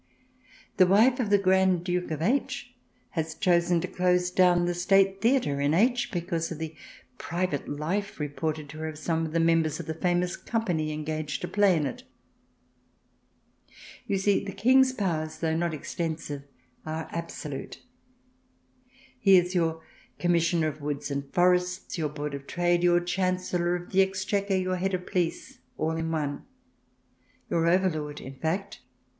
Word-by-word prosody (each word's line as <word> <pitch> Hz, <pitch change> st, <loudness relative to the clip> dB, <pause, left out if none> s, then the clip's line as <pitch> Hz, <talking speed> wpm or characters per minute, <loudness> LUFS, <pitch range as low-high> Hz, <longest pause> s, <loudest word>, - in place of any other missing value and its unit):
The 185 Hz, -, +6 dB
wife 230 Hz, +7 st, +5 dB
of 230 Hz, -5 st, 0 dB
the 205 Hz, -, +5 dB
Grand 190 Hz, -2 st, +3 dB
Duke 180 Hz, 0 st, -1 dB
of 155 Hz, 0 st, -3 dB
H. 260 Hz, +3 st, -1 dB, 0.4 s
has 160 Hz, -1 st, -3 dB
chosen 175 Hz, -3 st, +2 dB
to 180 Hz, -, -3 dB
close 180 Hz, 0 st, +1 dB
down 180 Hz, -1 st, +4 dB
the 175 Hz, -, 0 dB
State 195 Hz, +2 st, +3 dB
Theatre 225 Hz, -, +2 dB
in 145 Hz, +2 st, +2 dB
H. 240 Hz, +4 st, +2 dB
because 170 Hz, -3 st, -2 dB
of 165 Hz, -, -4 dB
the 160 Hz, 0 st, -5 dB, 0.5 s
private 170 Hz, -3 st, -2 dB
life, 170 Hz, +8 st, -3 dB
reported 150 Hz, +1 st, -3 dB
to 155 Hz, +1 st, -9 dB
her, 160 Hz, -, -3 dB
of 155 Hz, -1 st, -6 dB
some 160 Hz, +1 st, -1 dB
of -, -, -8 dB
the 165 Hz, -, +1 dB
members 165 Hz, -2 st, +2 dB
of -, -, -5 dB
the 160 Hz, -, -3 dB
famous 175 Hz, +2 st, 0 dB
company 175 Hz, -10 st, -2 dB
engaged 155 Hz, -1 st, -3 dB
to -, -, -3 dB
play 200 Hz, -4 st, +3 dB
in 150 Hz, -, 0 dB
it! 135 Hz, -, -5 dB, 2.1 s
You 200 Hz, -, +1 dB
see, 200 Hz, +1 st, +2 dB
the 200 Hz, -1 st, -6 dB
King's 260 Hz, +4 st, +4 dB
powers, 165 Hz, -10 st, -2 dB
though 160 Hz, -1 st, 0 dB
not 170 Hz, +1 st, 0 dB
extensive, 155 Hz, -2 st, -4 dB, 0.4 s
are 155 Hz, 0 st, -4 dB
absolute. 165 Hz, -4 st, -6 dB, 1.4 s
He 195 Hz, -4 st, +6 dB
is 180 Hz, +1 st, +1 dB
your 165 Hz, -2 st, 0 dB, 0.3 s
Commissioner 170 Hz, -2 st, +2 dB
of 150 Hz, 0 st, -10 dB
Woods 145 Hz, 0 st, -3 dB
and 140 Hz, 0 st, -4 dB
Forests, 180 Hz, 0 st, +1 dB
your 155 Hz, -2 st, 0 dB
Board 150 Hz, 0 st, -5 dB
of 140 Hz, 0 st, -7 dB
Trade, 175 Hz, 0 st, +1 dB
your 175 Hz, 0 st, +4 dB
Chancellor 180 Hz, -1 st, 0 dB
of 175 Hz, 0 st, -7 dB
the 195 Hz, -, +5 dB
Exchequer, 195 Hz, +1 st, 0 dB
your 185 Hz, 0 st, 0 dB
head 190 Hz, +1 st, 0 dB
of 180 Hz, 0 st, -6 dB
police, 185 Hz, +9 st, -2 dB, 0.2 s
all 155 Hz, +1 st, 0 dB
in 165 Hz, 0 st, -2 dB
one 150 Hz, -3 st, -2 dB, 0.5 s
— -, -, -39 dB
your 165 Hz, 0 st, +2 dB
overlord, 165 Hz, -5 st, +1 dB
in 130 Hz, -, -9 dB
fact. 195 Hz, +6 st, -2 dB
175 Hz, 160 wpm, -27 LUFS, 155-190 Hz, 2.1 s, The